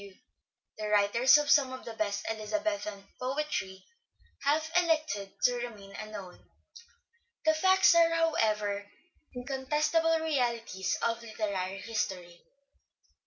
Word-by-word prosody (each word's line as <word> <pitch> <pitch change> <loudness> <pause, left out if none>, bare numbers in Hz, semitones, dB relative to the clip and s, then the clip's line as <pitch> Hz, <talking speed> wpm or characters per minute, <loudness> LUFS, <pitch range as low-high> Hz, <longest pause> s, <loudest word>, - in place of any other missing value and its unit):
W.", 200 -1 -13 0.6
the 215 - -3
writers 210 +6 +5
of 295 -1 +1
some 275 -3 +5
of 260 - -8
the 230 - -6
best 205 -2 -2
Elizabethan 220 -2 -3
poetry 255 -8 -3 0.6
have 310 +3 +1
elected 310 - +1
to 245 - +5
remain 215 -5 -7
unknown. 210 -4 -9 1.0
The 315 - +5
facts 375 +4 +5
are, 335 0 +5
however, 215 -11 0 0.5
incontestable 300 +6 +1
realities 235 -10 -1
of 230 0 0
literary 200 -4 -4
history. 180 -6 -4
235 Hz, 110 wpm, -30 LUFS, 205-305 Hz, 1.0 s, writers